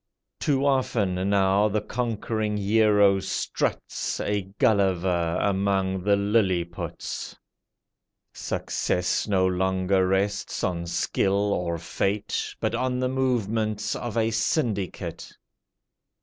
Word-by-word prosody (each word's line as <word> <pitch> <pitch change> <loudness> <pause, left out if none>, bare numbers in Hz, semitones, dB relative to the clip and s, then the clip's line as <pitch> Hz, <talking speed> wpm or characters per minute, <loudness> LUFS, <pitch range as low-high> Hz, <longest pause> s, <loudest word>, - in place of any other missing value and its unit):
Too 140 -2 +1
often 100 -9 +1
now 100 +1 +3
the 105 +1 0
conquering 110 -1 -2
hero 105 -1 +4
struts 95 - -2
A 105 0 0 0.2
Gulliver 95 -7 +2
among 95 -1 0
the 100 +2 +3
Liliputs. 100 -4 -1 1.0
Success 90 +4 -1
no 95 -3 +2
longer 95 0 +1
rests 100 +2 -1
on 85 -2 -1
skill 100 +4 +1
or 85 -2 -1
fate, 95 +5 -2
But - - -1
on 130 0 0
the 125 0 0
movements 110 -5 0
of 120 -2 -4
a 115 0 +2
syndicate. 110 - -2
100 Hz, 100 wpm, -25 LUFS, 95-110 Hz, 1.0 s, hero